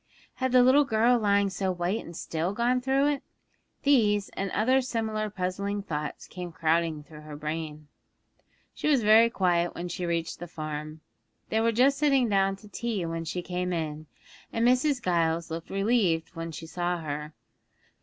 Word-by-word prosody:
Had 260 Hz, -1 st, 0 dB
the 250 Hz, 0 st, +6 dB
little 265 Hz, +4 st, +6 dB
girl 240 Hz, -1 st, +3 dB
lying 200 Hz, -2 st, +2 dB
so 190 Hz, 0 st, -1 dB
white 180 Hz, +4 st, -2 dB
and 170 Hz, 0 st, -10 dB
still 165 Hz, +4 st, -2 dB
gone 245 Hz, +3 st, +1 dB
through 270 Hz, +2 st, +2 dB
it? 290 Hz, -2 st, -1 dB, 0.6 s
These 210 Hz, -8 st, +3 dB
and 195 Hz, 0 st, -4 dB
other 255 Hz, +8 st, +2 dB
similar 220 Hz, -4 st, -2 dB
puzzling 200 Hz, +1 st, -3 dB
thoughts 150 Hz, -5 st, -4 dB
came 180 Hz, -1 st, -7 dB
crowding 165 Hz, -1 st, 0 dB
through 150 Hz, 0 st, -13 dB
her 150 Hz, -1 st, -9 dB
brain. 155 Hz, 0 st, -5 dB, 0.9 s
She -, -, -3 dB
was 280 Hz, -6 st, +3 dB
very 220 Hz, +2 st, +6 dB
quiet 175 Hz, -5 st, +1 dB
when 175 Hz, +1 st, -5 dB
she 175 Hz, 0 st, -3 dB
reached 170 Hz, -1 st, -2 dB
the 175 Hz, -, -6 dB
farm. 155 Hz, -1 st, -6 dB, 0.5 s
They 220 Hz, -, +1 dB
were 230 Hz, 0 st, +3 dB
just 265 Hz, +5 st, +3 dB
sitting 275 Hz, -4 st, +3 dB
down 195 Hz, -1 st, +2 dB
to 210 Hz, +2 st, -16 dB
tea 215 Hz, -4 st, -3 dB
when 165 Hz, 0 st, -4 dB
she 175 Hz, +2 st, -3 dB
came 180 Hz, +1 st, -2 dB
in, 155 Hz, -2 st, -3 dB, 0.4 s
and 230 Hz, +1 st, +2 dB
Mrs. 255 Hz, +1 st, +2 dB
Giles 165 Hz, -2 st, 0 dB
looked 165 Hz, 0 st, -5 dB
relieved 195 Hz, -6 st, +1 dB
when 165 Hz, 0 st, -5 dB
she 160 Hz, +1 st, -8 dB
saw 175 Hz, +2 st, -2 dB
her. 150 Hz, -1 st, -5 dB
185 Hz, 175 wpm, -27 LUFS, 165-230 Hz, 0.9 s, the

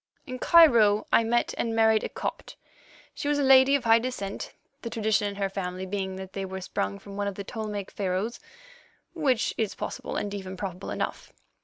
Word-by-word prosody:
In 255 Hz, -3 st, -6 dB
Cairo 235 Hz, -13 st, +6 dB
I -, -, +6 dB
married 225 Hz, -1 st, +2 dB
a -, -, -3 dB
Copt. -, -, -5 dB, 0.6 s
She -, -, -5 dB
was 295 Hz, 0 st, +2 dB
a 285 Hz, -, +1 dB
lady 265 Hz, +1 st, +6 dB
of 280 Hz, -, 0 dB
high 225 Hz, 0 st, +5 dB
descent, 225 Hz, -5 st, -5 dB, 0.3 s
the 230 Hz, -, -5 dB
tradition 220 Hz, -2 st, +1 dB
in 200 Hz, -, -5 dB
her 200 Hz, -1 st, -1 dB
family 185 Hz, -1 st, -4 dB
being 190 Hz, 0 st, -3 dB
that 190 Hz, 0 st, -8 dB
they 195 Hz, -, -3 dB
were 190 Hz, 0 st, -5 dB
sprung 100 Hz, -, -3 dB
from 200 Hz, -, -11 dB
one 205 Hz, 0 st, -1 dB
of 200 Hz, -, -3 dB
the 200 Hz, -, -5 dB
Ptolemaic 210 Hz, -2 st, -5 dB
Pharaohs, 195 Hz, +4 st, -2 dB, 0.7 s
which 275 Hz, -9 st, +1 dB
is 220 Hz, -3 st, -1 dB
possible -, -, -5 dB
and 205 Hz, -1 st, -3 dB
even 190 Hz, -2 st, -6 dB
probable 185 Hz, -1 st, -5 dB
enough. -, -, -4 dB
205 Hz, 185 wpm, -27 LUFS, 195-235 Hz, 0.7 s, Cairo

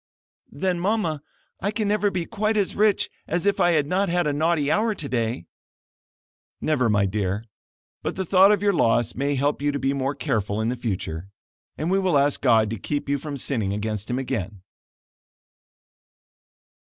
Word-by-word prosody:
"Then, 180 Hz, +5 st, -1 dB
Mama, 180 Hz, -6 st, 0 dB, 0.4 s
I 200 Hz, -, -1 dB
can 215 Hz, 0 st, -1 dB
never 205 Hz, 0 st, +2 dB
be 180 Hz, -3 st, -2 dB
quite 215 Hz, +2 st, -1 dB
as 200 Hz, -2 st, +1 dB
rich 210 Hz, 0 st, +3 dB, 0.2 s
as 175 Hz, +3 st, -1 dB
if 200 Hz, -, +2 dB
I 175 Hz, 0 st, +4 dB
had 150 Hz, -3 st, +2 dB
not 190 Hz, +5 st, 0 dB
had 175 Hz, 0 st, +1 dB
a 150 Hz, -, +1 dB
naughty 155 Hz, -1 st, +1 dB
hour 215 Hz, +3 st, +1 dB
today." 120 Hz, -, -2 dB, 1.1 s
"Never, 130 Hz, -7 st, +1 dB
my 105 Hz, -1 st, +3 dB
dear; 100 Hz, +1 st, -2 dB, 0.6 s
but -, -, -3 dB
the 190 Hz, -, -2 dB
thought 190 Hz, +3 st, +6 dB
of 205 Hz, -1 st, +1 dB
your 200 Hz, -1 st, +3 dB
loss 120 Hz, -7 st, +2 dB
may 140 Hz, +2 st, -1 dB
help 140 Hz, +2 st, 0 dB
you 145 Hz, 0 st, +1 dB
to 140 Hz, -, -2 dB
be 135 Hz, 0 st, 0 dB
more 140 Hz, +1 st, -1 dB
careful 105 Hz, -5 st, -1 dB
in 110 Hz, +1 st, 0 dB
the 125 Hz, -, -1 dB
future, 95 Hz, -7 st, -4 dB, 0.5 s
and 160 Hz, +4 st, -1 dB
we 195 Hz, -, +3 dB
will 185 Hz, -6 st, +2 dB
ask 140 Hz, 0 st, +2 dB
God 115 Hz, -5 st, +4 dB
to 115 Hz, -, -4 dB
keep 145 Hz, +8 st, -3 dB
you 140 Hz, 0 st, 0 dB
from 145 Hz, 0 st, -5 dB
sinning 110 Hz, -7 st, -1 dB
against 105 Hz, 0 st, -3 dB
him 125 Hz, -, -1 dB
again." 105 Hz, -7 st, -4 dB
145 Hz, 180 wpm, -24 LUFS, 115-185 Hz, 1.1 s, thought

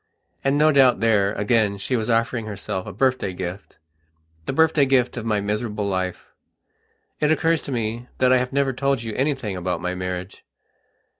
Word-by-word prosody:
And 135 Hz, +1 st, +2 dB
no 155 Hz, +1 st, +5 dB
doubt 135 Hz, -4 st, +5 dB
there, 105 Hz, -3 st, +2 dB
again, 105 Hz, -1 st, +1 dB
she 115 Hz, +6 st, -2 dB
was 110 Hz, -1 st, -1 dB
offering 115 Hz, 0 st, 0 dB
herself 100 Hz, -3 st, -5 dB
a -, -, -5 dB
birthday 130 Hz, -8 st, 0 dB
giftthe 90 Hz, +2 st, -7 dB, 0.7 s
birthday 150 Hz, 0 st, +3 dB
gift 130 Hz, -2 st, +2 dB
of 115 Hz, -2 st, -5 dB
my 105 Hz, -2 st, +1 dB
miserable 105 Hz, 0 st, -2 dB
life. 95 Hz, -2 st, -3 dB, 0.9 s
It 150 Hz, -, +2 dB
occurs 165 Hz, 0 st, +2 dB
to -, -, -7 dB
me 115 Hz, 0 st, -3 dB
that 130 Hz, 0 st, +4 dB
I 130 Hz, -, +5 dB
have 125 Hz, 0 st, -2 dB
never 135 Hz, -1 st, +1 dB
told 135 Hz, -1 st, 0 dB
you 110 Hz, -2 st, -5 dB
anything 130 Hz, -6 st, -1 dB
about 90 Hz, 0 st, -2 dB
my 90 Hz, 0 st, -3 dB
marriage. 90 Hz, +1 st, -5 dB
115 Hz, 170 wpm, -23 LUFS, 100-135 Hz, 0.9 s, no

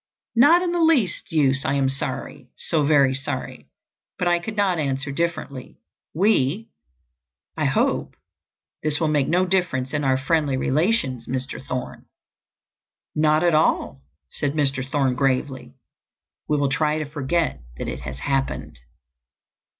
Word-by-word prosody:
"Not 320 Hz, +9 st, +6 dB
in 350 Hz, -, 0 dB
the 345 Hz, -1 st, 0 dB
least 280 Hz, -, +2 dB
use. 140 Hz, -4 st, +2 dB
I 135 Hz, -, 0 dB
am 135 Hz, -1 st, +2 dB
sorry—so 140 Hz, +3 st, -3 dB
very 140 Hz, -3 st, +4 dB
sorry—but 135 Hz, +5 st, -6 dB
I 175 Hz, 0 st, +3 dB
could 215 Hz, +5 st, -6 dB
not 190 Hz, -4 st, +2 dB
answer 140 Hz, 0 st, -2 dB
differently. 155 Hz, -4 st, -4 dB, 0.4 s
We—I 75 Hz, -, -2 dB
hope—this 150 Hz, -1 st, -3 dB
will 160 Hz, -, +1 dB
make 145 Hz, -3 st, +2 dB
no 180 Hz, +2 st, +2 dB
difference 175 Hz, -9 st, 0 dB
in 145 Hz, -1 st, 0 dB
our 130 Hz, -1 st, +2 dB
friendly 145 Hz, -1 st, +1 dB
relations, 135 Hz, -, 0 dB
Mr. 130 Hz, +1 st, -4 dB
Thorne?" 130 Hz, -2 st, -5 dB, 1.1 s
"Not 155 Hz, +1 st, +3 dB
at 175 Hz, -1 st, +3 dB
all," 155 Hz, -, +1 dB, 0.3 s
said 145 Hz, -1 st, -2 dB
Mr. 140 Hz, -3 st, 0 dB
Thorne 135 Hz, -1 st, 0 dB
gravely. 130 Hz, 0 st, -1 dB, 0.7 s
"We 150 Hz, -, +1 dB
will 140 Hz, -1 st, +1 dB
try 150 Hz, +2 st, +1 dB
to 155 Hz, -, -2 dB
forget 145 Hz, -, -1 dB, 0.2 s
that -, -, -4 dB
it -, -, -4 dB
has 65 Hz, 0 st, -7 dB
happened." 135 Hz, -, -2 dB
145 Hz, 130 wpm, -23 LUFS, 130-170 Hz, 1.1 s, Not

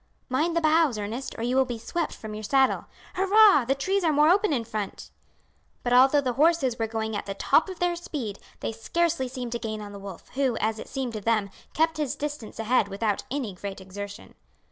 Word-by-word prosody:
"Mind 315 Hz, +7 st, +1 dB
the -, -, +2 dB
boughs, 310 Hz, -5 st, +3 dB
Ernest, 220 Hz, +6 st, -5 dB
or 225 Hz, -, -4 dB
you 245 Hz, +2 st, 0 dB
will 265 Hz, -, +5 dB
be 245 Hz, -2 st, -5 dB
swept 315 Hz, +9 st, -3 dB
from 215 Hz, -1 st, -8 dB
your 215 Hz, -, -5 dB
saddle. 265 Hz, +5 st, +2 dB, 0.3 s
Hurrah! 390 Hz, -, +6 dB
The 270 Hz, +3 st, +1 dB
trees 380 Hz, +8 st, 0 dB
are 325 Hz, -, +3 dB
more 300 Hz, +1 st, +5 dB
open 400 Hz, +1 st, +4 dB
in 250 Hz, -5 st, 0 dB
front." 215 Hz, -3 st, -5 dB, 0.7 s
But 245 Hz, -, 0 dB
although 270 Hz, +3 st, +6 dB
the 255 Hz, -3 st, -1 dB
horses 285 Hz, -4 st, +2 dB
were 225 Hz, -, 0 dB
going 220 Hz, -1 st, -3 dB
at 205 Hz, -, -4 dB
the 195 Hz, -, -4 dB
top 320 Hz, -, +3 dB
of 375 Hz, -, -7 dB
their 355 Hz, 0 st, +1 dB
speed 270 Hz, -, -5 dB, 0.2 s
they -, -, -2 dB
scarcely 310 Hz, +6 st, 0 dB
seemed 250 Hz, -2 st, -6 dB
to 235 Hz, -, -2 dB
gain 215 Hz, -2 st, -4 dB
on 205 Hz, -1 st, -8 dB
the 200 Hz, -, -9 dB
wolf, 195 Hz, -3 st, -10 dB
who, 260 Hz, -3 st, 0 dB
as 220 Hz, 0 st, -1 dB
it -, -, -8 dB
seemed 260 Hz, -3 st, -3 dB
to 215 Hz, -, -4 dB
them, 215 Hz, -2 st, +1 dB, 0.2 s
kept 320 Hz, +1 st, +2 dB
his 295 Hz, -5 st, -1 dB
distance 290 Hz, -6 st, -5 dB
ahead 225 Hz, -1 st, +2 dB
without 200 Hz, +1 st, -2 dB
any 255 Hz, -7 st, -3 dB
great 195 Hz, +2 st, -7 dB
exertion. 200 Hz, +2 st, -8 dB
250 Hz, 220 wpm, -26 LUFS, 215-305 Hz, 0.7 s, Hurrah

